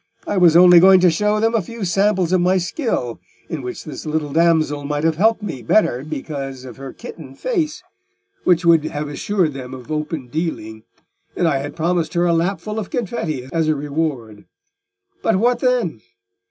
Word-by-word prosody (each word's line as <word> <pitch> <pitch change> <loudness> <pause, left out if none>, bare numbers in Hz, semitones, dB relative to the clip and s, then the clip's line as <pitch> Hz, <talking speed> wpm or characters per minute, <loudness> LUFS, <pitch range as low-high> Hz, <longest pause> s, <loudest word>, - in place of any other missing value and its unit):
I - - -2
was 175 -3 +6
only 180 -1 +8
going 190 +1 +7
to 180 -2 +5
show 210 +5 +1
them 225 +1 +1
a 225 - +2
few 225 +3 -6
samples 190 0 +1
of 185 - +3
my 185 +2 +3
skill, 180 - -2 0.3
in 160 -4 -4
which 125 -1 -6
this 155 - -8
little 155 -2 -3
damsel 160 -3 +2
might 145 +1 -2
have 160 -1 +1
helped 220 +3 +2
me 165 -9 -4
the 115 -3 -14
better 130 - +2
because 135 -3 -6
of 125 -3 -10
her 135 -1 -8
kitten 135 -5 -11
face, 345 - -2 0.6
which 175 -1 +2
would 165 -2 +5
have 150 -1 -4
assured 165 +2 -1
them 130 -1 -7
of 125 +2 -11
open 150 -3 -3
dealing; 120 -7 -4 0.5
and 175 - +1
I 140 -4 +1
had 145 +1 -6
promised 165 -1 -1
her 175 +1 +2
a 170 - +2
lapful 195 +6 -1
of 205 - -6
confetti 165 - -3
as 165 -2 +1
a 155 - +2
reward. 140 -8 -4 0.8
But - - +2
what 240 +5 +2
then? 245 - 0
165 Hz, 190 wpm, -20 LUFS, 145-190 Hz, 0.8 s, only